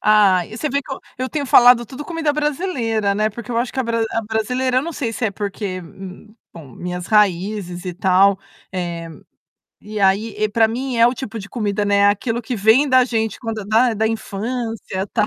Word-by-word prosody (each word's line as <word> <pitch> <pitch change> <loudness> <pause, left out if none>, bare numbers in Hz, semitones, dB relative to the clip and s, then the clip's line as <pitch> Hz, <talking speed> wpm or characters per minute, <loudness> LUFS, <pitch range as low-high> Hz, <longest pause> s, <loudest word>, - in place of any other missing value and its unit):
Ah, 200 -4 +4
e 220 - -10
você 305 - -2
vê 280 +1 +1
que 270 - -8
eu - - -5 0.2
eu 255 0 -2
tenho 285 -1 -3
falado 245 -1 +6
tudo 270 +6 -8
comida 325 -3 -1
brasileira, 265 - -1
né, 215 +1 +1
porque 235 +2 -9
eu 230 - -2
acho 240 +1 -2
que - - -6
a - - +2
a - - -7
bra 230 0 0
a 225 - -1
brasileira, 250 +4 0
eu - - -1
não 335 +2 -5
sei 235 -7 -3
se 235 - -3
é - - -1
porque, 200 -2 -4 0.7
bom, 150 -7 -12
minhas 180 0 -5
raízes 195 -3 +1
e 180 - -4
tal. 190 +1 +3 0.3
Eh, 170 -2 -4 0.7
e 210 0 -6
aí, 200 +3 +2
eh, 215 0 0
para 225 +1 +3
mim 250 +2 -3
é 230 0 +6
o 245 - +1
tipo 230 -3 -6
de 200 0 -8
comida, 210 -3 -1
né, 205 0 +2
é 200 - +5
aquilo 225 +4 0
que 245 +2 -4
vem 220 +8 +4
da 255 -1 +5
gente 225 -3 -2
quando 225 -3 -5
da 225 +3 +3
da 220 +1 0
infância 225 -2 -4
tal. 210 -2 +2
220 Hz, 220 wpm, -20 LUFS, 200-250 Hz, 0.7 s, falado